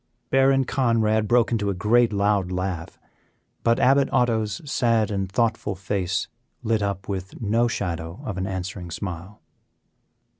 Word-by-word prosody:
Baron 135 Hz, 0 st, +4 dB
Conrad 115 Hz, -5 st, +1 dB
broke 120 Hz, +1 st, +3 dB
into 105 Hz, -3 st, 0 dB
a 100 Hz, -, -1 dB
great, 115 Hz, +5 st, +3 dB
loud 100 Hz, -2 st, +1 dB
laugh, 90 Hz, -2 st, -3 dB, 0.6 s
but 115 Hz, 0 st, +2 dB
Abbot 135 Hz, +2 st, +4 dB
Otto's 110 Hz, -5 st, +1 dB
sad 115 Hz, -6 st, +1 dB
and 95 Hz, -2 st, -2 dB
thoughtful 115 Hz, -3 st, 0 dB
face 95 Hz, 0 st, -2 dB, 0.4 s
lit 110 Hz, -2 st, +1 dB
up 100 Hz, -2 st, -3 dB
with 95 Hz, -1 st, -5 dB
no 115 Hz, +2 st, +2 dB
shadow 85 Hz, -6 st, -4 dB
of 100 Hz, -3 st, -4 dB
an 95 Hz, -, -2 dB
answering 95 Hz, -1 st, -5 dB
smile. 90 Hz, +3 st, -6 dB
105 Hz, 140 wpm, -24 LUFS, 95-115 Hz, 0.6 s, Baron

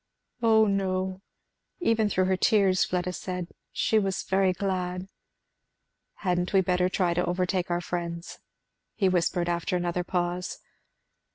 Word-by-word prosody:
"O 220 Hz, -1 st, +5 dB
no!" 190 Hz, -2 st, -1 dB, 0.6 s
even 225 Hz, -, +2 dB
through 185 Hz, -1 st, +2 dB
her 190 Hz, 0 st, +2 dB
tears 190 Hz, -1 st, +3 dB
Fleda 180 Hz, 0 st, -2 dB
said, 180 Hz, -1 st, -4 dB, 0.2 s
"she 220 Hz, -, +2 dB
was 195 Hz, -2 st, -1 dB
very 190 Hz, 0 st, +2 dB
glad." 185 Hz, -1 st, -2 dB, 1.2 s
"Hadn't 180 Hz, 0 st, 0 dB
we 195 Hz, -, +6 dB
better 180 Hz, 0 st, +1 dB
try 180 Hz, -2 st, +1 dB
to 175 Hz, +1 st, +1 dB
overtake 180 Hz, +1 st, 0 dB
our 175 Hz, 0 st, 0 dB
friends?" 170 Hz, -1 st, -5 dB, 0.6 s
he 195 Hz, -, +2 dB
whispered 175 Hz, -1 st, +1 dB
after 175 Hz, +1 st, -1 dB
another 175 Hz, 0 st, -1 dB
pause. 175 Hz, 0 st, -2 dB
185 Hz, 130 wpm, -27 LUFS, 175-190 Hz, 1.2 s, we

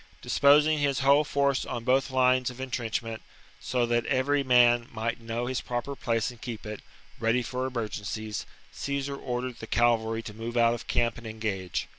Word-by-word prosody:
Disposing 150 Hz, +2 st, +4 dB
his 140 Hz, -1 st, +1 dB
whole 140 Hz, +2 st, +5 dB
force 140 Hz, -2 st, +1 dB
on 120 Hz, -, -5 dB
both 135 Hz, +2 st, +2 dB
lines 130 Hz, -1 st, +3 dB
of 125 Hz, -, -10 dB
Defeat 130 Hz, -, -5 dB
of -, -, -1 dB
entrenchment, 115 Hz, -1 st, -3 dB, 0.4 s
so 125 Hz, -1 st, 0 dB
that 120 Hz, 0 st, 0 dB
every 140 Hz, +2 st, +2 dB
man 120 Hz, -2 st, +5 dB
might 115 Hz, +1 st, -3 dB
know 115 Hz, +1 st, -3 dB
his 130 Hz, 0 st, -2 dB
cavalry. -, -, -20 dB
proper 140 Hz, -, -6 dB
place 115 Hz, -2 st, -1 dB
and 120 Hz, -, -16 dB
keep 120 Hz, -5 st, -6 dB
it, 105 Hz, -1 st, -6 dB, 0.4 s
ready 115 Hz, +2 st, +2 dB
for 130 Hz, +2 st, -3 dB
emergencies, 110 Hz, -3 st, -4 dB, 0.2 s
Caesar 140 Hz, 0 st, -3 dB
ordered 125 Hz, -2 st, -4 dB
the 110 Hz, -, -7 dB
cavalry 115 Hz, -1 st, +2 dB
to 105 Hz, -, -8 dB
move 115 Hz, +2 st, -5 dB
out 115 Hz, 0 st, +5 dB
of 120 Hz, -, -6 dB
camp 120 Hz, -1 st, 0 dB
and 120 Hz, -, -9 dB
engage. 100 Hz, -6 st, -3 dB
120 Hz, 190 wpm, -28 LUFS, 115-130 Hz, 0.4 s, whole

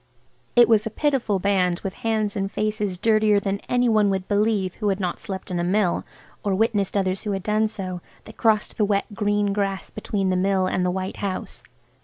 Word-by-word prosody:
It 240 Hz, -1 st, +7 dB
was 220 Hz, -2 st, +3 dB
a -, -, -2 dB
pitiful 255 Hz, -4 st, 0 dB
band 185 Hz, -2 st, +1 dB
with 195 Hz, -, -4 dB
hands 215 Hz, -2 st, 0 dB
and 195 Hz, 0 st, -2 dB
faces 210 Hz, -3 st, -1 dB
dirtier 215 Hz, 0 st, +3 dB
than 200 Hz, 0 st, -2 dB
any 245 Hz, 0 st, +2 dB
one 215 Hz, -3 st, +3 dB
would 190 Hz, -1 st, -2 dB
believe 205 Hz, -3 st, +1 dB
who 210 Hz, -2 st, -1 dB
had 195 Hz, 0 st, 0 dB
not 180 Hz, -3 st, -2 dB
slept 190 Hz, -3 st, -6 dB
in 175 Hz, -, -1 dB
a -, -, 0 dB
mill 185 Hz, 0 st, +1 dB, 0.4 s
or 200 Hz, -2 st, +1 dB
witnessed 205 Hz, -2 st, +1 dB
others 190 Hz, -1 st, 0 dB
who 210 Hz, -, -2 dB
had 195 Hz, -1 st, -3 dB
done 215 Hz, +1 st, +2 dB
so, 185 Hz, -4 st, -5 dB, 0.2 s
that 220 Hz, -, -12 dB
crossed 215 Hz, -2 st, +1 dB
the 210 Hz, -, +3 dB
wet, 200 Hz, -1 st, +1 dB
green 205 Hz, -1 st, +1 dB
grass 195 Hz, -1 st, -2 dB
between 200 Hz, -3 st, -2 dB
the -, -, +1 dB
Mill 190 Hz, 0 st, +2 dB
and 185 Hz, 0 st, 0 dB
the 180 Hz, -, +1 dB
white 185 Hz, +1 st, -3 dB
house. 195 Hz, -2 st, -4 dB
200 Hz, 210 wpm, -23 LUFS, 190-215 Hz, 0.4 s, It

